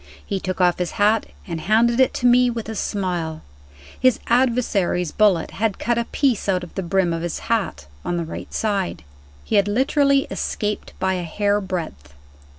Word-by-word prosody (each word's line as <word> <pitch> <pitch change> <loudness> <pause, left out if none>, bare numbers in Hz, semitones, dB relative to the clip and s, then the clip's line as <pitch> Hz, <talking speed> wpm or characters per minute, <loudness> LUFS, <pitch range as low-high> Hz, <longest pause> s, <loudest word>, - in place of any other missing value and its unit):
He 195 - -2
took 185 0 -4
off 180 -1 +3
his 180 -2 -2
hat, 210 +2 +3 0.2
and 165 -4 -5
handed 235 +5 +3
it 260 - +5
to 250 - -2
me 245 0 +5
with 230 -2 -4
a 220 - -4
smile. 180 -7 -3 0.6
His 255 -2 +3
adversary's 230 -8 +1
bullet 200 -6 +2
had 215 -1 -1
cut 235 0 0
a 235 - -1
piece 250 -7 0
out 180 -2 +1
of 175 - -10
the 195 - -3
brim 185 -1 +1
of 165 - -3
his 175 -1 -3 0.2
hat, 210 - -2 0.2
on 175 - -2
the 170 - -2
right 160 - -8
side. 195 - -1 0.4
He 215 - +1
had 200 0 +3
literally 275 +5 +3
escaped 210 0 -3
by 190 0 +1
a 180 - -2
hair 205 +5 0
breadth. 160 - -5
200 Hz, 185 wpm, -22 LUFS, 180-230 Hz, 0.6 s, it